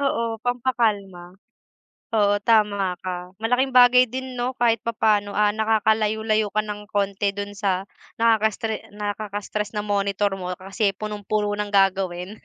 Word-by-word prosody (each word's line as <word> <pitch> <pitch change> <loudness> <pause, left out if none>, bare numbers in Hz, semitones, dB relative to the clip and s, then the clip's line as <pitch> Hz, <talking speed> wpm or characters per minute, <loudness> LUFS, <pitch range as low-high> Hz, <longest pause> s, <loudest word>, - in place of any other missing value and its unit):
oo, 275 -4 0 0.2
pampakalma. 215 -8 -1 0.8
Oo, 205 -1 +3
tama 205 -4 +2
ka, 180 0 -5
malaking 250 +4 +1
bagay 250 0 +7
din 260 +2 -5
'no, 245 +2 -2
kahit 230 -2 +2
papaano, 210 -3 +1
ah, 210 0 +4
nakakalayo-layo 220 0 +1
ka 215 - +2
ng 210 -1 -7
konti 200 0 0
do'n 200 0 -4
sa 195 -2 -1 0.4
nakaka-stre 220 -1 +1
nakaka-stress 210 0 -4
na 210 - 0
monitor 200 0 0
mo, 180 -1 -6
kasi 195 +2 -1
punong-puno 210 0 -2
ng 210 0 -3
gagawin. 190 0 +1
210 Hz, 130 wpm, -23 LUFS, 200-220 Hz, 0.8 s, bagay